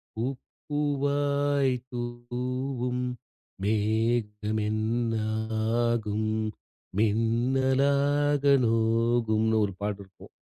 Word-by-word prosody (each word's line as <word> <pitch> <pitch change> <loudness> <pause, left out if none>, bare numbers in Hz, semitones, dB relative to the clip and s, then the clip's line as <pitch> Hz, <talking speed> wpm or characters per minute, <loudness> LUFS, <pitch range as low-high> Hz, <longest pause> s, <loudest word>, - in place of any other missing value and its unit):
பூப் 125 +3 -2 0.3
பூவாய் 145 -1 +1 0.2
தூவும். 125 +1 -3 0.6
மேகம் 110 0 0
என்ன 115 +2 0 0.7
ஆகும்? 110 -2 0 0.7
மின்னலாக 135 +6 +2 0.2
நோகும்ன்னு" 115 -1 +2
ஒரு 100 - -1
பாட்டு 100 -1 -2
இருக்கும். 95 - -17
120 Hz, 65 wpm, -27 LUFS, 110-135 Hz, 0.7 s, மின்னலாக